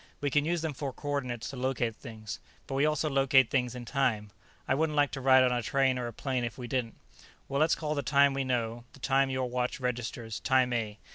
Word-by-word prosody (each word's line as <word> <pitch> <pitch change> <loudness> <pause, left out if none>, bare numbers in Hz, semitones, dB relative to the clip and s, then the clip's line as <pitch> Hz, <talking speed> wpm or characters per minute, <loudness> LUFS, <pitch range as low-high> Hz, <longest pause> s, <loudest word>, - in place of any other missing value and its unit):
"We 145 -1 -1
can 145 +1 +2
use 170 0 -1
them 160 -2 -2
for 140 0 -4
coordinates 130 -4 -3
to 135 - -8
locate 125 -3 -1
things, 110 -4 -8 0.3
but - - -6
we 140 +3 +3
also 155 0 0
locate 135 -3 +4
things 125 -3 0
in 125 -1 -7
time. 115 -6 0 0.4
I - - +2
wouldn't 155 +2 0
like 145 -1 +3
to 135 - -5
ride 130 0 +6
on 125 - +3
a 120 -1 0
train 130 +2 +1
or 120 - -3
a - - -5
plane 130 +2 -2
if 120 -3 -4
we 125 - -6
didn't. 120 -2 -2 0.5
Well, 140 +1 -1
let's 160 +1 +4
call 150 -1 -2
the 145 - -1
time 140 +2 +4
we 135 0 -1
know, 120 -2 -2
the - - -15
time 135 +1 +2
your 130 -1 -1
watch 125 +1 -2
registers, 120 -3 -3
Time 130 -2 +2
A. 110 -3 -2
130 Hz, 235 wpm, -30 LUFS, 120-140 Hz, 0.5 s, ride